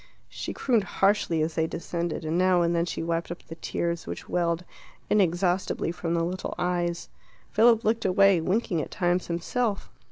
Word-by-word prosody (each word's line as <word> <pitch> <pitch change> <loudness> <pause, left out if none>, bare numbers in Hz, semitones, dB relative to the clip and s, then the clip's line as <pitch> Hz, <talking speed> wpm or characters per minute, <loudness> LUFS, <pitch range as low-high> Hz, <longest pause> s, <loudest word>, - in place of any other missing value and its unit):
She - - -5
crooned 235 -6 +1
harshly 195 -4 +1
as 160 +1 -2
they 160 +1 +1
descended, 170 0 -4
and 155 +1 -1
now 180 -1 +4
and 170 0 +1
then 170 +1 +1
she 165 - -3
wiped 165 0 -2
up 175 - -7
the - - -9
tears 170 +1 -3
which - - -6
welled 170 0 0 0.5
inexhaustibly 180 -3 +1
from 170 0 -2
the 165 - +1
little 180 +2 -4
eyes. 175 -1 -1 0.4
Philip 230 +1 +5
looked 225 +1 +1
away, 195 -1 +5
winking 185 -1 0
at - - -6
times 175 0 0
himself. 200 +5 -2
175 Hz, 170 wpm, -27 LUFS, 170-195 Hz, 0.5 s, Philip